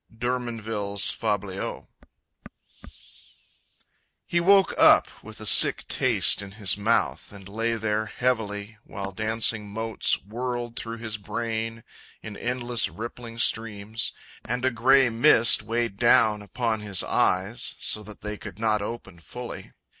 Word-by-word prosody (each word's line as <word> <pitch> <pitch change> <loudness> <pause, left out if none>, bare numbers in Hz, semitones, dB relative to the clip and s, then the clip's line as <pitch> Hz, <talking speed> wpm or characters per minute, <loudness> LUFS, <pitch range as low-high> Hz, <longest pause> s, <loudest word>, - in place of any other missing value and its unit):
D'Hermonville's 115 -4 -1
Fabliaux. 100 -3 -3 2.4
He 175 - 0
woke 195 +2 +4
up - - +4
with - - -9
a - - -7
sick - - +5
taste - - +3
in 100 -1 -10
his 105 -3 0
mouth 105 +3 0
And 100 -2 -12
lay 115 +3 -2
there 110 -1 -1
heavily, 110 -3 -2
while 100 -2 -6
dancing 110 0 0
motes 110 +2 0
Whirled 120 +3 -5
through 115 -1 -5
his 110 -1 -4
brain 115 +2 -4 0.4
in 110 - -8
endless, 120 +1 0
rippling 115 +1 -8
streams, 110 -1 0 0.3
And 125 +1 -2
a 130 - +2
grey 130 +2 +4
mist 115 -1 +5
weighed 115 -1 -2
down 115 -2 +4
upon 110 +1 -2
his 100 -3 +1
eyes 95 +7 0
So 105 - -1
that 105 0 -11
they 105 0 -5
could 85 - -9
not 110 -1 +1
open 100 -5 -7
fully. 120 +10 -9
110 Hz, 130 wpm, -25 LUFS, 105-120 Hz, 2.4 s, sick